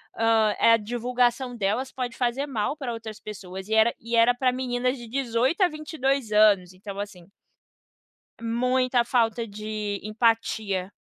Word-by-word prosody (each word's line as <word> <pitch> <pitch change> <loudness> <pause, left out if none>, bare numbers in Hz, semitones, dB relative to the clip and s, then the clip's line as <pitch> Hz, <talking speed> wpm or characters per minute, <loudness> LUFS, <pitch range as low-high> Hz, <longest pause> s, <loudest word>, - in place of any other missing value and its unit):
ah, 225 -2 +3 0.2
a - - +6
divulgação 245 +3 0
delas 230 +5 -1
pode 245 -2 -4
fazer 250 +3 -1
mal 265 +2 -2
pra 255 -5 -4
outras 220 -1 -8
pessoas 190 -2 -8
e 220 - -2
era 220 +2 +4
e 235 +1 -3
era 230 +1 +5
pra 250 0 +1
meninas 250 0 -1
de 235 -2 -10
18 260 - 0
a 370 - +6
22 280 -6 -2
anos 200 -4 +4
então 195 +1 -9
assim 195 -3 -7 1.1
muita 250 +1 +1
falta 235 -2 +1
de 210 -1 -4
empatia. 215 -3 0
230 Hz, 145 wpm, -25 LUFS, 215-250 Hz, 1.1 s, a